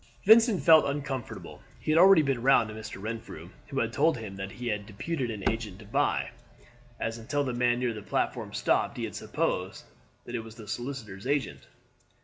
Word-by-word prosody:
Vincent 220 - +6
felt 160 -1 +8
uncomfortable. 140 -3 -5 0.2
He - - -2
had 160 - +5
already 190 -3 +8
been 135 -4 0
round 120 -3 +4
to - - -7
Mr. 110 -2 -8
Renfrew, 110 -5 -7 0.2
who 135 -2 -3
had 115 0 -2
told 155 +1 +3
him 105 -4 -7
that 95 0 -6
he 125 0 -6
had 105 -2 -3
deputed 125 +5 -3
an 105 -4 -3
agent 110 -4 -2
to 105 - -13
buy; 105 - 0 0.7
and 115 - -2
until 145 +6 -1
the 130 -3 -2
man 120 0 +2
near 125 -1 -1
the 105 - -7
platform 100 - -2
stopped - - 0
he - - -3
had - - -4
supposed - - -2 0.4
that 120 - -8
he 120 - -1
was 110 0 -10
the 110 -3 -11
solicitor's 120 -3 -6
agent. 145 0 -2
120 Hz, 195 wpm, -28 LUFS, 110-140 Hz, 0.7 s, felt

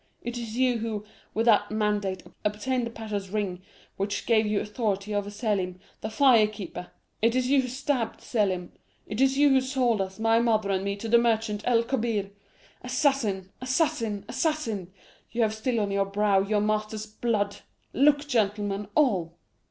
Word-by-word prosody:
It 240 +1 -4
is 230 -1 -5
you 250 -2 +2
who, 215 -2 -3 0.3
with 225 +2 +1
that 210 -3 +4
mandate, 210 -3 -1 0.2
obtained 235 +4 -1
the - - -5
pasha's 215 -4 -5
ring, 195 -3 -2 0.4
which 200 +1 -2
gave 225 -2 +3
you 210 -1 +1
authority 210 -2 -2
over 205 0 -1
Selim, 205 -4 -2 0.2
the 215 - -3
fire 230 -2 +5
keeper! 195 -4 -7 0.3
It 230 +2 +3
is 255 0 +1
you 280 -1 +5
who 255 - -4
stabbed 255 -2 -2
Selim. 190 -6 -1 0.3
It 210 +4 -3
is 270 0 +3
you 290 0 +6
who 265 -1 +5
sold 255 -5 +1
us, 190 0 -4
my 225 +1 +3
mother 220 -4 +2
and 190 0 0
me, 200 0 -1
to 205 +3 -6
the 235 +1 +5
merchant, 220 -3 +1
El 235 -2 +3
Kobbir! 230 -5 -1 0.5
Assassin, 250 -7 0
assassin, 255 - 0
assassin, 255 - -2 0.4
you 235 0 0
have 215 -1 +1
still 230 +2 -1
on 205 -2 -1
your 195 0 +1
brow 200 0 +2
your 205 +2 +1
master's 215 0 -1
blood! 210 -2 -1 0.4
Look, 285 +2 +4
gentlemen, 205 -4 0
all! 185 - +2
215 Hz, 170 wpm, -27 LUFS, 205-240 Hz, 0.5 s, you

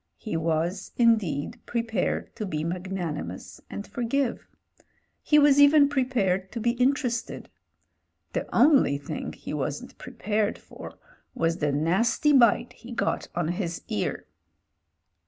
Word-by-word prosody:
He 215 - -5
was, 165 +4 -1
indeed, 225 - +2
prepared 230 -2 -2
to 215 - -4
be 155 -4 -3
magnani 175 -2 -3
mous - - -9
and 205 - -6
forgive; 245 +1 -2 0.7
he 300 - +3
was 285 -1 +6
even 285 0 +7
prepared 215 -9 0
to 235 - -3
be 235 +1 +1
inter 275 +1 +3
ested; 235 0 -4 0.9
the - - -2
only 260 - +4
thing 140 - -6
he - - -8
wasn't 145 0 -4
prepared 210 +1 -2
for - - -12 0.4
was 165 0 0
the 145 -2 0
nasty 190 - +2
bite 240 -2 +4
he 245 - -13
got 235 - -1
on 175 -2 -1
his 175 -2 -3
ear. 105 - -2
210 Hz, 135 wpm, -26 LUFS, 165-245 Hz, 0.9 s, even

